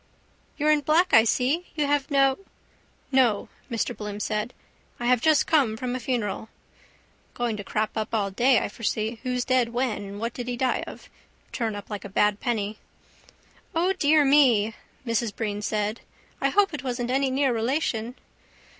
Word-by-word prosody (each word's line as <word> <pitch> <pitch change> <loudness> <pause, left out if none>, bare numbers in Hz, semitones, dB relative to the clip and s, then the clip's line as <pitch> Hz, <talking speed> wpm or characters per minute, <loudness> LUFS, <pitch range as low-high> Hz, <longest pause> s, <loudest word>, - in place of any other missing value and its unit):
—You're 305 0 +3
in 300 -1 +3
black, 330 +6 +2
I 225 - +7
see. 270 +10 +1
You 300 -2 +1
have 285 -1 0
no... 275 0 +3 0.7
—No, 245 -6 +2 0.2
Mr 235 0 -2
Bloom 210 -1 -6
said. 215 +2 -2 0.5
I 240 - -4
have 250 -1 +3
just 310 -1 +4
come 265 -9 +2
from 250 +1 -3
a - - -3
funeral. 230 -4 -2 0.9
Going 240 -2 -1
to 205 - -6
crop 215 +2 -1
up 220 0 -3
all 205 -3 0
day, 245 +5 +4
I - - 0
foresee. 220 +1 -3
Who's 250 -1 -2
dead, 255 -3 +2
when 240 -2 -1
and 200 +1 -8
what 230 +2 -3
did 245 -1 -6
he 245 -1 -3
die 260 0 0
of? - - -10 0.4
Turn 225 -4 -2
up 205 +1 -9
like 205 - -5
a 200 - -7
bad 210 +1 +2
penny. 215 -3 -2 1.0
—O, 355 +3 +2
dear 305 -4 +4
me, 250 -7 +4 0.3
Mrs 230 -2 -1
Breen 210 -2 -3
said. 210 +1 -2 0.4
I 275 - +3
hope 395 +3 +3
it 295 - -5
wasn't 245 -1 -2
any 270 +1 +2
near 265 -1 +1
relation. 235 -1 -1
245 Hz, 175 wpm, -25 LUFS, 215-270 Hz, 1.0 s, I